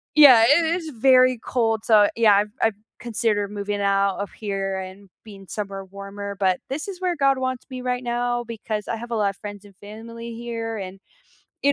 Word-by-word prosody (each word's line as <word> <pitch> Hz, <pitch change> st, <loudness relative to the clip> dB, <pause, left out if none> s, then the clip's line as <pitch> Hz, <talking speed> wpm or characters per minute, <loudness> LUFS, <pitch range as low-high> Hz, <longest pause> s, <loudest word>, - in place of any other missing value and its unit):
Yeah, 255 Hz, -7 st, +9 dB
it 320 Hz, +4 st, +5 dB
is 325 Hz, -3 st, -5 dB
very 255 Hz, 0 st, +4 dB
cold, 225 Hz, -1 st, -1 dB
so 210 Hz, -2 st, +6 dB
yeah, 220 Hz, -3 st, +5 dB
I've 205 Hz, +1 st, +1 dB
I've 225 Hz, -2 st, +2 dB, 0.2 s
considered 215 Hz, -3 st, -1 dB
moving 205 Hz, 0 st, -3 dB
out 195 Hz, -1 st, +2 dB
of 200 Hz, -, -4 dB
here 195 Hz, -2 st, -3 dB
and 190 Hz, +1 st, -10 dB
being 200 Hz, -3 st, -12 dB
somewhere 195 Hz, -2 st, -5 dB
warmer, 200 Hz, +1 st, -7 dB
but 185 Hz, -2 st, +2 dB
this 295 Hz, +8 st, -4 dB
is 380 Hz, -2 st, -7 dB
where 360 Hz, -2 st, 0 dB
God 275 Hz, -2 st, +2 dB
wants 255 Hz, -1 st, -3 dB
me 255 Hz, -1 st, -6 dB
right 250 Hz, 0 st, -2 dB
now 240 Hz, 0 st, -1 dB
because 220 Hz, -2 st, -5 dB
I 230 Hz, -, -2 dB
have 235 Hz, +1 st, -9 dB
a -, -, 0 dB
lotta 200 Hz, -2 st, +1 dB
friends 205 Hz, -1 st, -8 dB
and 200 Hz, -2 st, -17 dB
family 230 Hz, +3 st, -9 dB
here 230 Hz, -1 st, -5 dB
and, 190 Hz, 0 st, -7 dB, 0.6 s
you 285 Hz, +1 st, +4 dB
220 Hz, 195 wpm, -23 LUFS, 200-245 Hz, 0.6 s, Yeah